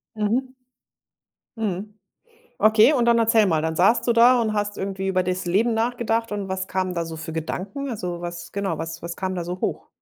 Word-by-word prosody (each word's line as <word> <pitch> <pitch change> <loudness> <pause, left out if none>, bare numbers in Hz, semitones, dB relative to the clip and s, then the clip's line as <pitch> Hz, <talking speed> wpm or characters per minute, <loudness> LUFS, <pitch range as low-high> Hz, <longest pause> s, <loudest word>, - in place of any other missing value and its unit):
Mhm. 240 +5 -1 1.0
Mhm. 210 0 -4 0.6
Okay, 220 +5 +6
und 245 -5 +2
dann 235 0 +4
erzähl 225 -2 +4
mal, 160 -3 +1
dann 160 0 -2
saßt 195 +7 +4
du - - +5
da 240 +2 +6
und 215 -1 -1
hast 205 -1 -2
irgendwie 195 0 -3
über 185 -1 +1
des 185 0 -2
Leben 220 +6 +2
nachgedacht 230 -1 -1
und 200 -2 -3
was 190 0 -3
kamen 185 -1 -2
da 170 -1 -2
so 165 -1 -7
für 160 +1 -7
Gedanken? 195 - -4
Also, 180 -7 -4
was 175 0 -7
genau, 200 -1 -2
was 165 0 -5
was 170 0 -6
kam 185 -1 -3
da 175 - -3
so 180 +1 -5
hoch? - - -3
195 Hz, 205 wpm, -23 LUFS, 175-225 Hz, 1.0 s, Okay